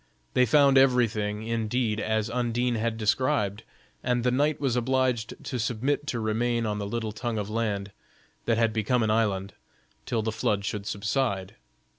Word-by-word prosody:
They 125 0 +4
found 140 +2 +6
every 125 -3 +5
thing, 105 0 -3
indeed, 115 0 -1
as 110 0 0
Undine 120 +1 0
had 115 0 -1
described, 110 -2 +1 0.4
and 125 -1 +1
the 125 - +2
knight 145 +4 +1
was 135 -4 0
obliged 125 -2 0
to 125 - -4
submit 125 +6 -1
to 120 - -2
remain 115 +2 0
on 105 -1 -2
the 100 - -3
little 110 0 -3
tongue 115 +1 -3
of 105 0 -3
land, 105 -3 -2 0.5
that 115 -1 +2
had 115 -1 +2
become 115 +3 +1
an 110 - +1
island, 100 -3 0 0.5
till 115 -3 0
the 110 - -1
flood 105 -2 -1
should 105 -1 -3
subside. 100 -2 -1
115 Hz, 170 wpm, -27 LUFS, 105-125 Hz, 0.5 s, found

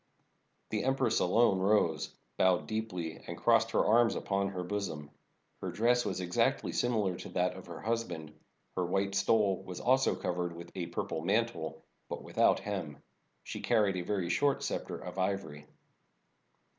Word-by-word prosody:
The 105 -1 0
empress 130 -3 +2
alone 100 +1 +4
rose, 95 -6 +2 0.2
bowed 90 -1 +3
deeply, 100 -7 -4
and - - -5
crossed - - +4
her - - +2
arms 115 +1 +4
upon 100 0 0
her 95 -2 -4
bosom. 85 -7 -4 0.5
Her - - -3
dress 120 +2 +2
was - - -2
exactly 90 0 +1
similar 110 -7 +1
to 90 - -8
that 90 0 +1
of 95 -1 -10
her 85 -2 -7
husband. 110 -10 -3 0.4
Her 90 - 0
white 95 +2 0
stole 100 -1 +2
was 90 -1 -7
also 130 +1 +3
cov 90 -1 -3
ered 90 -1 -2
with 85 0 -10
a 90 -3 -3
purple 85 -2 -3
mantle, 90 -5 -1 0.3
but - - -5
without - - +3
hem. 90 -8 -4 0.5
She - - -6
car 110 - +3
ried 100 -2 +1
a - - -1
very 90 -1 -1
short 140 +7 +2
scepter - - -3
of 95 - -7
ivory. 95 -6 -2
95 Hz, 165 wpm, -32 LUFS, 85-110 Hz, 0.5 s, alone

